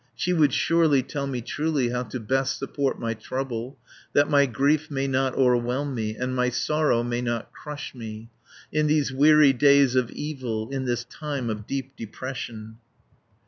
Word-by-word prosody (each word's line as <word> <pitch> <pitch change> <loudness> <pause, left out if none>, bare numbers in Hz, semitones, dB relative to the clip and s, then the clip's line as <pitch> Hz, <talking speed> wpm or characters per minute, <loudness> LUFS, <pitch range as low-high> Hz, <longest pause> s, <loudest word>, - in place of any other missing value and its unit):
She 180 +9 0
would 155 -5 +4
surely 160 -3 +3
tell 140 +1 -4
me 130 -3 -3
truly 145 0 -1
How 125 0 -1
to 125 +1 -5
best 130 +4 0
support 135 0 -2
my 115 -1 -2
trouble, 125 +2 -5 0.4
That 145 +1 +3
my 140 -1 +5
grief 140 +6 +1
may 135 -2 -1
not 130 -1 0
o'erwhelm 125 +2 +1
me, 110 -3 -3
And 125 +2 -3
my 125 0 +2
sorrow 150 -1 +1
may 120 0 -2
not 120 -2 -3
crush 150 -1 -7
me, 115 -2 -8 0.4
In 155 0 +1
these 150 -3 +1
weary 150 0 +6
days 140 0 +5
of 130 -2 +2
evil, 130 -7 -4
In 135 -1 -2
this 120 -1 -1
time 140 -4 -4
of 105 -1 -6
deep 135 0 -4
depression." 115 -1 -7
130 Hz, 170 wpm, -25 LUFS, 120-145 Hz, 0.4 s, weary